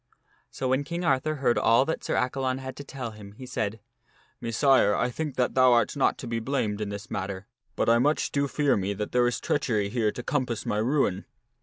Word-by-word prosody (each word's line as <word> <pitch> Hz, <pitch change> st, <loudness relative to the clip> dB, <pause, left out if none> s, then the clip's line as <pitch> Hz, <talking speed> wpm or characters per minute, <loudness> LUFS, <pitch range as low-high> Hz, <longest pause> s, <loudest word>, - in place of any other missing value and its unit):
So 130 Hz, -, -3 dB
when 130 Hz, +2 st, +2 dB
King 170 Hz, +4 st, -4 dB
Arthur 155 Hz, +1 st, +1 dB
heard 130 Hz, -4 st, +1 dB
all 115 Hz, +4 st, +4 dB
that 160 Hz, -, -3 dB
Sir -, -, -1 dB
Accalon 130 Hz, 0 st, 0 dB
had 130 Hz, 0 st, -7 dB
to 145 Hz, -, -7 dB
tell 130 Hz, -4 st, -6 dB
him, 105 Hz, -2 st, -12 dB
he 130 Hz, +5 st, -10 dB
said, 110 Hz, -3 st, -3 dB, 0.3 s
" -, -, -35 dB
Messire, 115 Hz, -2 st, +3 dB
I 125 Hz, +1 st, 0 dB
think 150 Hz, +1 st, -4 dB
that 125 Hz, -1 st, +1 dB
thou 130 Hz, -1 st, +5 dB
art 120 Hz, +4 st, +2 dB
not 140 Hz, -, +2 dB
to 125 Hz, -, -7 dB
be 115 Hz, 0 st, -2 dB
blamed 110 Hz, -4 st, -1 dB
in 105 Hz, -, -2 dB
this 100 Hz, +2 st, -7 dB
matter, 95 Hz, +1 st, -4 dB, 0.3 s
but -, -, 0 dB
I 115 Hz, +1 st, +5 dB
much 145 Hz, +5 st, +1 dB
do 140 Hz, 0 st, +1 dB
fear 145 Hz, -1 st, +2 dB
me 100 Hz, 0 st, -1 dB
that 105 Hz, +2 st, -4 dB
there 125 Hz, 0 st, +3 dB
is 120 Hz, -, -1 dB
treachery 110 Hz, -8 st, 0 dB
here 110 Hz, -1 st, +1 dB
to 125 Hz, -, -7 dB
com 130 Hz, -1 st, 0 dB
pass 115 Hz, -2 st, -4 dB
my 105 Hz, -, 0 dB
ruin." 110 Hz, -5 st, +1 dB
125 Hz, 230 wpm, -27 LUFS, 110-135 Hz, 0.3 s, thou